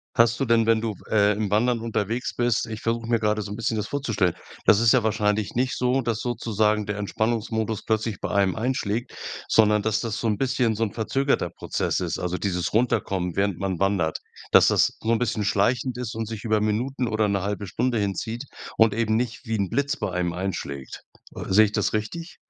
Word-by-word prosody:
Hast 115 0 +4
du 135 - +1
denn, 115 -1 +3
wenn 115 -1 +4
du 110 -1 -2
w - - -17
äh, 105 -1 +4
im 105 -1 -2
Wandern 115 +3 +2
unterwegs 115 +4 -2
bist 120 -1 +1
ich 110 0 -6
versuche 115 0 -1
mir 120 - +3
grade 105 0 +1
so 100 -1 -6
'n - - -4
bisschen 115 0 -1
das 105 - -2
vorzustellen. 110 -11 0 0.3
Das 100 - +6
ist 115 0 +5
ja 130 - +4
wahrscheinlich 105 -1 0
nicht 125 +1 0
so, 125 +1 +1
dass 115 -3 -1
sozusagen 110 -3 0
der 105 0 -3
Entspannungsmodus 110 +1 -1
plötzlich 110 -2 -1
bei - - -2
einem 100 -2 +2
einschlägt, 120 -1 -2 0.3
sondern, 105 -1 +4
dass 110 0 0
das 115 -3 -3
so 115 - -1
'n 105 -2 +1
bisschen, 125 -4 +1
so 115 - -1
'n 105 - -2
verzögerter 135 +5 0
Prozess - - -2
ist, - - -2
also 90 0 -2
dieses 90 -3 -2
Runterkommen, 95 -6 0
während 100 -3 +1
man 95 -2 -2
wandert. 95 -5 +1 0.3
Dass, - - +7
das - - +3
so 115 - 0
'n 115 - +4
bisschen 110 -2 -1
schleichend 120 +5 +1
ist 120 -2 -4
und 110 -1 -3
sich 110 -2 -6
über 110 -2 +1
Minuten 120 +4 -1
oder 110 -1 +1
1/2 100 +1 -2
Stunde 120 +5 -1
hinzieht 105 +4 -2 0.3
und 110 -2 +5
eben 110 0 +1
nicht 120 0 -2
wie 115 - 0
'n 100 -3 -1
Blitz 140 +2 0
bei 105 -4 -3
einem 90 -1 -1
einschlägt. 85 -8 -5 0.5
Sehe 110 +3 +6
ich 105 - -3
das - - 0
richtig? 140 +11 -4
110 Hz, 210 wpm, -24 LUFS, 100-115 Hz, 0.5 s, Dass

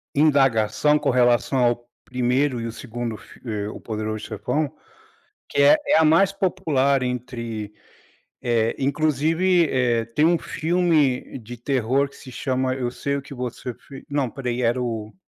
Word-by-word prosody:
indagação 140 -2 +3
com 150 -1 -1
relação 125 +1 +3
ao 120 0 +1 0.2
1º 125 +1 0
e - - -4
o 115 - -3
2º 115 0 -5
f - - -16
eh, 105 -3 -3
O - - -8
Poderoso 110 -1 -4
Chefão, 140 +7 -2 0.8
que 140 - +1
é 145 +2 +7
é - - +5
a 160 - +5
mais 170 +5 +5
popular 150 -9 +1
entre, 115 -4 -4 0.7
eh, 115 -2 +1
inclusive, 155 +5 +2
eh, 120 -3 +1
tem 115 +7 +1
um 170 +1 +4
filme 160 -7 0
de 120 +1 -9
terror 130 +2 +1
que 140 - -19
se 130 - -12
chama 130 0 -1
Eu 125 -2 -2
Sei 140 +2 -2
o 140 - -4
que 140 - -11
Você 125 -1 -5
Fi 135 +3 -13
não 140 -3 0
pera 125 0 -5
aí, 120 +1 -2
era 120 +1 +1
o 110 -3 -4
130 Hz, 165 wpm, -23 LUFS, 120-145 Hz, 0.8 s, é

